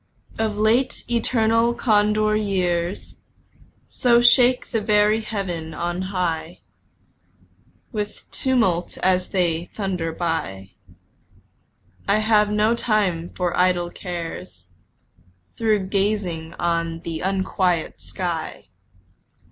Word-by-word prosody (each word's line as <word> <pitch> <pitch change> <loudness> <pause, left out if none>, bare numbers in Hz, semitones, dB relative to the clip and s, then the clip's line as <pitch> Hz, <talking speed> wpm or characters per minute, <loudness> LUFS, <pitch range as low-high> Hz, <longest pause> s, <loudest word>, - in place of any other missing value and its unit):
Of 220 -2 -1
late, 225 +5 +2
eternal 230 0 +2
Condor 215 -1 +2
years 185 -3 -1 0.7
So 240 -2 +3
shake 245 +1 +4
the 225 - 0
very 210 +1 +3
Heaven 180 -7 -4
on 175 +2 -2
high 175 -3 -3 1.3
With 210 -3 -5
tumult 225 -10 0
as 185 -1 +2
they 175 -2 0
thunder 185 -5 -2
by, 160 - -3 1.4
I 200 - +3
have 215 -1 +3
no 210 +2 +2
time 200 -8 0
for 180 -2 0
idle 180 -1 +2
cares 165 - -7 0.9
Though 220 -2 +3
gazing 190 -4 -2
on 170 -1 -1
the 165 -1 -5
unquiet 185 -3 -1
sky. 170 - -5
190 Hz, 95 wpm, -22 LUFS, 170-215 Hz, 1.4 s, shake